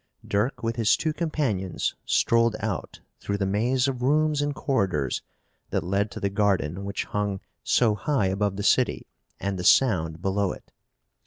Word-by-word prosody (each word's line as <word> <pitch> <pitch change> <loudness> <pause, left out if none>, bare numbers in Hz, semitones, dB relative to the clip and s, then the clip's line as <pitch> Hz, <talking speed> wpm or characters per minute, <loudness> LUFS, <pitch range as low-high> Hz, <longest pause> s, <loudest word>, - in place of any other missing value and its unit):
Dirk, 105 +7 -1
with 115 +1 -1
his 115 -1 +3
two 160 -1 -1
companions, 135 - -1
strolled 115 -1 +3
out 110 -4 -4 0.2
through 100 - -2
the 100 - 0
maze 120 +7 +1
of 130 -2 -3
rooms 150 +2 +2
and 145 -1 -1
corridors 95 - 0 0.5
that - - -1
led 100 +3 0
to - - -7
the 100 - -1
garden 100 -3 0
which 100 0 -2
hung 105 -1 -2 0.2
so 115 -4 +3
high 105 +2 0
above 100 +1 0
the 100 - -4
city - - +2 0.3
and 100 -1 -2
the - - -3
Sound 85 -9 +3
below 95 +1 0
it. - - -15
105 Hz, 165 wpm, -26 LUFS, 95-125 Hz, 0.5 s, his